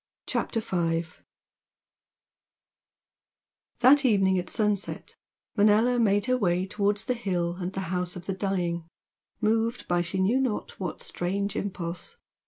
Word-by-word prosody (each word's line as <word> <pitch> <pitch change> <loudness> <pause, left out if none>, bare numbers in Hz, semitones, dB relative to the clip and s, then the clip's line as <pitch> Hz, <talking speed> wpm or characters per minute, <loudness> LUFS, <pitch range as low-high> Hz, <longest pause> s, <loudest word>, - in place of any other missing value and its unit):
CHAPTER 225 - -1
V 170 -5 0 2.8
That 275 +3 +7
evening 195 -6 +3
at 180 - -5
sunset 210 -3 -1 0.4
Manella 220 +4 +4
made 205 -3 +3
her 255 0 +1
way 180 -3 +1
towards 205 +1 0
the 250 - +1
hill 180 -7 -2
and 180 0 -3
the 190 - -4
"House 180 0 -2
of 180 -1 -8
the 195 - -2
Dying," 180 -4 -2 0.5
moved 225 +2 +1
by 175 0 +2
she 175 +2 -4
knew 210 +8 +3
not 255 -5 -2
what 185 -3 -4
strange 200 +3 -2
impulse. 180 - -4
195 Hz, 130 wpm, -27 LUFS, 180-220 Hz, 2.8 s, That